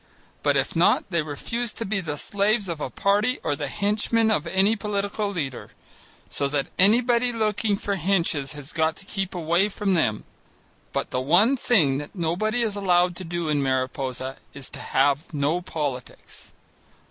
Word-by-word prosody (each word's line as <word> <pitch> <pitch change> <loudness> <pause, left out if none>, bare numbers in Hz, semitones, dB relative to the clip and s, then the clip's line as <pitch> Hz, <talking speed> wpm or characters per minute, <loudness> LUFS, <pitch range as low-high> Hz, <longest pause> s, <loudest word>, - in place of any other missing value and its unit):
But - - +2
if - - -1
not, - - +4
they 170 -2 +2
refuse 220 +11 -3
to 230 - -5
be 200 +1 -1
the 150 -4 -4
slaves 205 +4 0
of 165 -3 -4
a - - -2
party 205 - +1
or 145 - 0
the 145 0 -3
henchmen 215 - +1
of 155 - 0
any 195 +3 +3
political 205 0 -2
leader. 145 -10 -4 0.6
So 140 - -1
that 140 -1 -1
anybody 235 +5 +4
looking 215 -2 0
for 200 0 -2
henches 165 -6 0
has 145 0 -8
got 160 0 +1
to 195 - -11
keep 195 -2 -3
away 175 +4 +2
from 200 -1 -1
them. 110 -12 +1 0.7
But - - -3
the 125 - 0
one 180 - +4
thing 160 - +2
that 145 +5 -9
nobody 200 +8 0
is 215 -3 -1
allowed 180 -3 +2
to 185 - -6
do 175 -1 -3
in 150 -2 +1
Mariposa 130 0 -2 0.2
is 140 -2 -7
to - - -9
have 140 +4 +1
no 150 +5 +1
politics. 145 -7 -6
180 Hz, 170 wpm, -25 LUFS, 145-210 Hz, 0.7 s, not